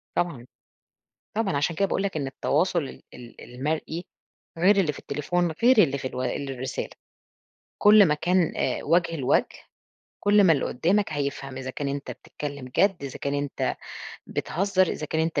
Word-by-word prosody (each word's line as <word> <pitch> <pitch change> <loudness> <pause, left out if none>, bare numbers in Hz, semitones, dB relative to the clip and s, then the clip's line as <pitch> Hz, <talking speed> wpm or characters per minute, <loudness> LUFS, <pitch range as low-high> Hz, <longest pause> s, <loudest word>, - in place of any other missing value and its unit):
طبعًا. 140 -9 -1 0.9
طبعًا. 205 -8 0
عشان 160 +4 0
كده 195 +4 +2
باقول 195 - -1
لك 195 -5 -2
إن 140 -2 -2
التواصل 170 +4 0
ال 135 - -9
ال 120 -1 -12
المرئي، 155 +5 -2 0.5
غير 190 +5 +5
اللي 170 -6 +3
في - - -10
التليفون، 170 +4 -1
غير 255 0 +6
اللي 140 -2 0
في 130 - -4
ال 130 +2 -3
الرسالة. 130 0 -4 0.9
كل 210 -1 +7
ما 150 - +2
كان 175 +2 +1 0.3
وُجه 165 +1 +2
لوَجه، 130 -4 +2 0.7
كل 205 0 +5
ما 165 - +6
اللي 140 - +1
قُدّامك 190 +8 +1
هيفهم 140 -2 -3
إذا 130 0 -5
كان 140 +1 -4
أنت 140 0 -4
بتتكلّم 140 -3 -7
جَد، 195 -6 +3
إذا 135 - -6
كان 140 0 -2
أنت 145 -1 -2 0.5
بتهزّر، 190 +1 +1
إذا 150 - -3
كان 160 +1 -1
أنت 160 -3 0
155 Hz, 165 wpm, -26 LUFS, 140-185 Hz, 0.9 s, كل